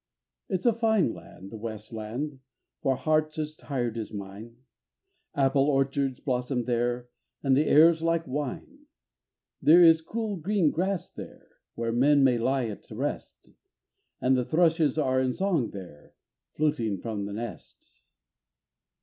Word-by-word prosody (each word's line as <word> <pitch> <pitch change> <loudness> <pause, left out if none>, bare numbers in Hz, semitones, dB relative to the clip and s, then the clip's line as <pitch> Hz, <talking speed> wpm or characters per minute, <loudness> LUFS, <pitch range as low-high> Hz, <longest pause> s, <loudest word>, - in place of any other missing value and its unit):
It's 185 +1 -2
a 240 - +5
fine 220 - +2
land, 95 +1 -12
the 115 - -7
west 110 0 -7
land, 125 +6 -5 0.4
for 135 - +1
hearts 155 +3 0
as 155 0 -4
tired 120 -7 -3
as 110 - -6
mine, 105 +3 -9 0.8
Apple 135 +1 +3
orchards 135 -1 0
blossom 125 -1 -1
there, 120 0 -1 0.4
and 135 -2 +3
the 150 +3 +2
air's 160 +2 +6
like 165 0 0
wine. 150 - -5 0.7
There 170 +3 +7
is 165 -1 +6
cool 215 +4 -4
green 175 -2 +1
grass 185 +1 -2
there, - - -11 0.3
where 115 0 -2
men 140 +4 +4
may 125 -3 +3
lie 130 +2 +1
at 110 -3 -8
rest, - - -5 0.7
And 130 +1 +3
the 125 - +1
thrushes 160 0 +2
are 130 -4 +2
in 130 -1 0
song 175 - 0
there, 90 -7 -11 0.4
fluting 145 -10 0
from 105 0 -4
the 100 - -6
nest. 115 -2 -9
135 Hz, 140 wpm, -27 LUFS, 120-160 Hz, 0.8 s, There